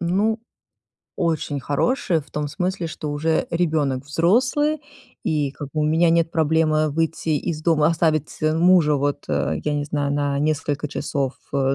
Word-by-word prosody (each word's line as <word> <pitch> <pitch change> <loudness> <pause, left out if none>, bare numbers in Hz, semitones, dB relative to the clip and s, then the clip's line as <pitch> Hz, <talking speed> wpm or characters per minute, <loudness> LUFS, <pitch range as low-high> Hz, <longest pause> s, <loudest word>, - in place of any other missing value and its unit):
ну 200 +6 +1 0.8
очень 155 -4 -1
хороший, 165 - 0
в 150 - -18
том 150 -1 -3
смысле, 180 +1 -2
что 155 -1 -5
уже 160 +2 0
ребёнок 150 -6 0
взрослый. 255 - +2 0.4
И 150 -3 0
как 145 0 -8
бы 155 - 0
у - - +2
меня 160 +3 +3
нет 165 0 +2
проблемы 155 -1 +2
выйти 160 +2 -2
из 155 +1 -1
дома, 155 -2 +3
оставить, 155 -2 0
э, 155 0 +2
мужа, 170 -3 +5
вот, 145 +1 -1
э, 75 +1 0
я 150 -1 -1
не 145 0 -1
знаю, 145 -1 -1
на 145 0 0
на 140 - -1
несколько 150 0 -1
часов, 140 -2 -2 0.2
э, 135 -1 +1
155 Hz, 170 wpm, -22 LUFS, 145-165 Hz, 0.8 s, мужа